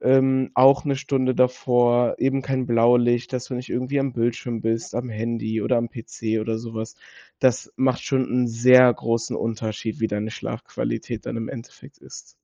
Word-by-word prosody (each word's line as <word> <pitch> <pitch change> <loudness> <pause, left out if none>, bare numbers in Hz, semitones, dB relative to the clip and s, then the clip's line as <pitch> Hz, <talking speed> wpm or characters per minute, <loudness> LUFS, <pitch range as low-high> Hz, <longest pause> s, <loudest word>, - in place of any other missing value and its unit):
Ähm, 130 0 +3
auch 135 +2 +5
'ne 140 -2 0
Stunde 130 -1 0
davor 120 -1 +2
eben 135 +1 +1
kein 130 -2 -2
Blaulicht, 120 +1 +3
dass 125 -1 -3
du 130 - -6
nicht 125 +1 -6
irgendwie 130 +3 -1
am 135 -2 -2
Bildschirm 120 -1 -2
bist, 115 +1 -2
am 125 +1 -3
Handy 110 0 -3
oder 125 - +1
am 115 0 -2
PC 110 -1 -4
oder 110 +1 -2
sowas. 110 -1 -7 0.5
Das 130 -1 +1
macht 130 -1 +1
schon 130 -2 +1
'n 125 0 +1
sehr 125 +2 +6
großen 115 +1 -2
Unterschied, 110 -1 -4
wie 110 - +2
deine 105 +1 -3
Schlafqualität - - -5
dann - - -4
im 115 -1 -4
Endeffekt 115 -3 -11
ist. - - -13
120 Hz, 175 wpm, -23 LUFS, 115-130 Hz, 0.5 s, sehr